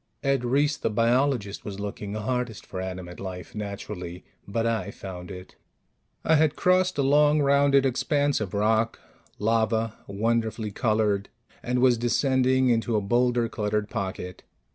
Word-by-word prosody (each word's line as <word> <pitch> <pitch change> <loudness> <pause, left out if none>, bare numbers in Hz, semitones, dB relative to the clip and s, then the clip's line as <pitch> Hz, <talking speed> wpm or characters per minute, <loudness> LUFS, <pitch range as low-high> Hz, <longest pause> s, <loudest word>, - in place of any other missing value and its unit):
Ed 135 -2 +1
Reiss, 145 +4 +2
the - - -1
biologist, 115 -1 +1
was 100 -1 -6
looking 100 0 -5
hardest 120 0 -3
for 95 - -6
animate 90 -2 -6
life, 90 -2 -7
naturally. 100 -4 -6 0.2
But 115 +3 -1
I 110 -4 -1
found 90 -3 -8
it. 90 0 -10 0.7
I 160 - +4
had 155 -1 +3
crossed 185 -1 +2
a 140 - +2
long, 150 +2 +4
rounded 140 0 +4
expanse 140 +1 +1
of 100 -2 -4
rock 110 +2 +1 0.4
lava, 110 0 0
wonderfully 110 +1 -1
colored 105 -2 0 0.3
and 125 +1 -1
was 125 -2 +4
descending 130 +2 +2
into 115 -1 +1
a - - +3
boulder 120 +3 +1
cluttered 105 -1 -2
pocket. 95 -4 -4
115 Hz, 140 wpm, -26 LUFS, 100-130 Hz, 0.7 s, I